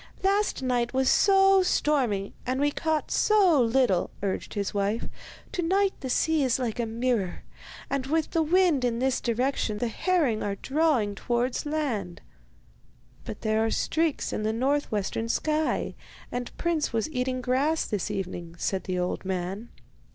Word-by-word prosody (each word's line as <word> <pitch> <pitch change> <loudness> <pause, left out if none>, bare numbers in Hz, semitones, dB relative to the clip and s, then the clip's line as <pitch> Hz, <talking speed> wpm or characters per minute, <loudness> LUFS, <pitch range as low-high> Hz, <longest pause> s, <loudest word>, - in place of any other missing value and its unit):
'Last 400 -6 +1
night 245 -1 0
was 265 0 +3
so 390 -1 +5
stormy, 255 - +1
and 255 +1 -1
we 290 +1 +2
caught 315 0 -1
so 385 -9 +4
little,' 235 -6 +2
urged 195 +2 -3
his 200 -2 -2
wife; 205 +3 -1 0.4
'to 360 - -2
night 385 +3 +2
the 260 - -5
sea 315 +4 +2
is 255 -2 +2
like 245 -3 -3
a 235 - 0
mirror, 230 -4 -1 0.4
and 275 -1 -2
with 315 +2 0
the 330 - +2
wind 335 -3 +3
in 240 -2 +1
this 260 +1 0
direction 240 -2 0
the 235 +2 -1
herring 295 - +1
are 200 -1 -2
drawing 270 -5 +1
towards 240 +6 -1
land.' 245 - -2 1.1
'But - - -7
there 220 0 +1
are 225 - +1
streaks 320 +5 0
in - - -2
the 215 +1 0
north 275 +5 0
western 215 +2 -2
sky, 310 +5 0 0.4
and 245 0 -4
Prince 335 -3 0
was 225 -2 0
eating 255 -1 -1
grass 270 +6 +1
this 205 -2 -2
evening,' 175 -4 -5
said 190 +2 -2
the 185 -1 -2
old 180 0 -2
man. 190 +4 -4
255 Hz, 160 wpm, -27 LUFS, 215-310 Hz, 1.1 s, so